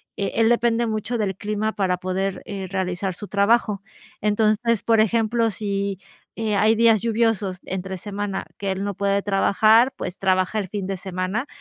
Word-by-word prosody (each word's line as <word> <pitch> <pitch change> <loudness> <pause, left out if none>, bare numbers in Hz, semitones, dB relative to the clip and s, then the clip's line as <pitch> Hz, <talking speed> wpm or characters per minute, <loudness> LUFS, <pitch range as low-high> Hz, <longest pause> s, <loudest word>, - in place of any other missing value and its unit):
eh, 200 - -2
él 225 0 +4
depende 235 0 +2
mucho 220 +2 -2
del 200 -3 -1
clima 215 +2 -2
para 185 -3 0
poder, 185 +1 -2
eh, 195 -2 -5
realizar 190 0 -2
su 205 +4 -7
trabajo. 205 0 +2 0.4
Entonces, 215 +1 +2
por 225 -1 +3
ejemplo, 225 +1 +1
si, 200 -1 -2 0.4
eh, 215 -2 0
hay 215 +3 +4
días 225 -2 +4
lluviosos 225 -4 0
entre 190 0 -4
semana 205 +1 -4
que 200 - -2
él 190 +1 -3
no 200 0 -2
puede 200 +1 0
trabajar, 215 +5 +4
pues, 180 0 -6
trabaja 185 +2 +1
el 195 - -3
fin 200 0 -4
de 195 +1 -2
semana, 185 +6 -3
205 Hz, 170 wpm, -23 LUFS, 190-220 Hz, 0.4 s, él